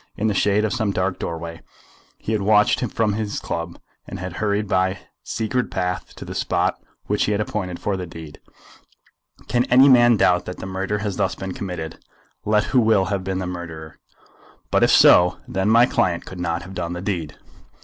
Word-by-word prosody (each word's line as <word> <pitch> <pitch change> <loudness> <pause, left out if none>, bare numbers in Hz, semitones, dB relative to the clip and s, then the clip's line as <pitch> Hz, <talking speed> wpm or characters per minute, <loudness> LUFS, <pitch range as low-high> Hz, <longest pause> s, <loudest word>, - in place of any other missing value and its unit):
In 105 - -2
the 110 - +2
shade 105 +2 +2
of 110 - -1
some 110 -5 0
dark 95 -1 -1
doorway 85 0 -5 0.6
he - - -5
had 110 -2 0
watched 105 +1 +4
him 125 - -2
from 110 -2 0
his 105 -1 -3
club, 85 0 -5 0.3
and - - -7
had 90 -1 -6
hurried 105 0 0
by 95 0 +1
his - - -15 0.2
secret 120 +3 -2
path 90 -2 -3
to - - -9
the - - -7
spot - - -1 0.2
which 105 - 0
he 105 - 0
had 100 - -1
appointed 95 -4 -3
for 100 - -1
the 90 -1 -5
deed. 80 -2 -11 1.1
Can 120 0 +2
any 130 +3 +6
man 120 -3 +6
doubt 90 -2 +3
that 90 - -6
the - - -7
murder 95 +2 -2
has 105 -2 -3
thus 95 - 0
been 95 -1 -6
committed, 90 -5 -6 0.4
let 105 0 +3
who 125 - +2
will 110 -4 +3
have 95 -2 -2
been 95 0 -2
the 95 - -3
murderer? 85 -3 -7 0.7
But, - - +3
if - - +4
so, 90 +1 +6
then 95 +2 -1
my 115 +2 +6
client 95 -10 0
could 95 - -9
not 85 0 -2
have 95 +2 -10
done 85 -2 -4
the 90 - -5
deed." 85 -7 -3
95 Hz, 205 wpm, -22 LUFS, 90-105 Hz, 1.1 s, any